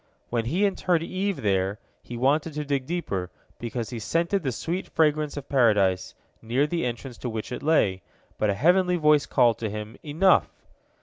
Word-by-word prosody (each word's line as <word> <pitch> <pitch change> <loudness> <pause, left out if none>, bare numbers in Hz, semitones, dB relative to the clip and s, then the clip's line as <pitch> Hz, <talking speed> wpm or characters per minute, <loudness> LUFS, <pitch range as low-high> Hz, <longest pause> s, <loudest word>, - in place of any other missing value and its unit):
When 115 -2 0
he 175 - +1
interred 180 -4 +1
Eve 190 - -2
there, 95 0 +1 0.2
he 120 - -8
wanted 145 +5 +1
to 150 0 -3
dig 140 -2 -1
deeper, 100 - -3 0.3
because 120 0 -4
he 120 - -4
scented 170 - 0
the 135 -5 -1
sweet 170 +9 -3
fragrance 150 -2 +1
of 140 - -6
Paradise, 105 -8 +2 0.3
near 120 +6 +1
the 165 -3 -1
entrance 120 +1 -6
to 125 - -4
which 110 +1 -5
it 125 - -4
lay, 105 -12 +2 0.4
but 105 - +2
a 100 - +1
heavenly 180 - +3
voice 150 -3 +3
called 120 -4 +3
to 110 - -2
him, 105 +2 -7
Enough! 160 +6 +3
135 Hz, 180 wpm, -25 LUFS, 115-165 Hz, 0.4 s, heavenly